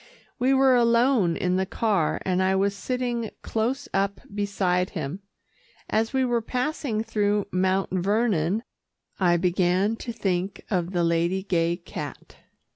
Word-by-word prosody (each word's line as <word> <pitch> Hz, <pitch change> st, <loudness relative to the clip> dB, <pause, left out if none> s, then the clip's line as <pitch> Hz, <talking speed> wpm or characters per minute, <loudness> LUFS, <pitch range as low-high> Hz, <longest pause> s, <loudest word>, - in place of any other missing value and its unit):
We 255 Hz, +2 st, +3 dB
were 265 Hz, -1 st, +5 dB
alone 235 Hz, -6 st, +3 dB
in 180 Hz, 0 st, 0 dB
the 190 Hz, -, +1 dB
car, 200 Hz, -7 st, 0 dB
and 185 Hz, 0 st, +1 dB
I 190 Hz, +1 st, +2 dB
was 200 Hz, +1 st, +1 dB
sitting 240 Hz, 0 st, -2 dB
close 250 Hz, +6 st, -1 dB
up 195 Hz, 0 st, 0 dB
beside 190 Hz, -3 st, 0 dB
him. 155 Hz, +4 st, -4 dB, 0.7 s
As 225 Hz, +1 st, +1 dB
we 265 Hz, -1 st, +1 dB
were 240 Hz, -1 st, +1 dB
passing 250 Hz, -2 st, -2 dB
through 205 Hz, -2 st, 0 dB
Mount 190 Hz, +1 st, +1 dB
Vernon 200 Hz, 0 st, +1 dB, 0.6 s
I 175 Hz, -2 st, +4 dB
began 180 Hz, +4 st, +2 dB
to 235 Hz, -, -5 dB
think 190 Hz, -4 st, -2 dB
of 175 Hz, -3 st, 0 dB
the 175 Hz, -2 st, 0 dB
Lady 170 Hz, +3 st, +1 dB
Gay 170 Hz, -3 st, +1 dB
cat. 175 Hz, -, -8 dB
200 Hz, 140 wpm, -25 LUFS, 180-230 Hz, 0.7 s, were